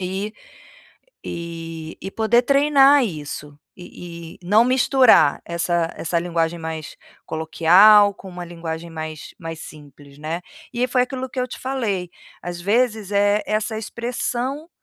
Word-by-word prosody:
e 190 +3 -3 0.9
e 165 -1 -7
e 195 - -5
poder 225 +3 +2
treinar 280 +1 +5
isso, 150 -5 -7 0.2
e 170 -2 -10
e - - -33
não 210 +6 +5
misturar 255 - +4
essa 170 -1 -1
essa 170 +1 -1
linguagem 170 -1 -1
mais 160 -1 -6 0.3
coloquial 185 +6 +5
com 195 - -12
uma 180 -1 -7
linguagem 165 -1 -6
mais 155 -1 -7
mais 165 -1 -7
simples, 145 -1 -13
né. 160 +4 -4 0.3
E 240 - -3
aí 250 - +3
foi 250 0 +2
aquilo 260 0 -4
que 260 - -3
eu 250 - -2
te - - -8
falei, 215 -10 -2 0.3
às 175 0 -6
vezes, 215 0 0
eh, 205 +1 +3
essa 215 +1 -1
expressão 245 +6 -4
180 Hz, 140 wpm, -21 LUFS, 165-235 Hz, 0.9 s, treinar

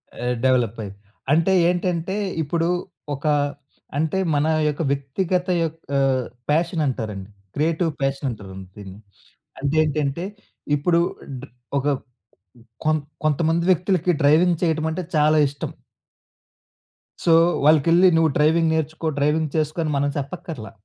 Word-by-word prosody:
ఆ! - - -5 0.2
డెవలపయ్యింది. 115 -6 0 0.3
అంటే 165 +5 +3 0.2
ఏంటంటే 180 +1 -1 0.3
ఇప్పుడు 165 +3 -1 0.5
ఒక 140 - -11 0.7
అంటే 160 +5 0 0.2
మన 145 - +2 0.2
యొక్క 150 +2 -2
వ్యక్తిగత 175 +7 -1 0.2
యొక్క 165 -1 -6 0.6
ప్యాషన్ 165 +2 +1
అంటారండి. 105 -6 -4 0.3
క్రియేటివ్ 160 +2 +1
ప్యాషన్ 135 +1 -1
అంటారండి 95 -4 -8
దీన్ని. 100 0 -10 0.6
అంటే, 140 +2 -1
ఏంటంటే 150 +2 -1 0.5
ఇప్పుడు 170 +4 +2 0.4
డ - - -14 0.4
ఒక 140 - -3 1.0
కొం 155 0 +3 0.3
కొంతమంది 160 +2 +1
వ్యక్తులకి 180 0 +2
డ్రైవింగ్ 165 +4 +4
చేయడమంటే 160 +1 0
చాలా 155 +1 +4
ఇష్టం. 140 0 -6 1.5
సో, 170 - +3 0.3
వాళ్ళకెళ్లి 165 +4 +5
నువ్వు 160 -2 +3
డ్రైవింగ్ 160 +2 +3
నేర్చుకో 160 +1 -2
డ్రైవింగ్ 150 +1 +1
చేసుకో 155 +2 -1
అని 155 - -1
మనం 145 +1 +1
చెప్పక్కర్లా. 140 -4 -6
155 Hz, 110 wpm, -22 LUFS, 140-165 Hz, 1.5 s, వాళ్ళకెళ్లి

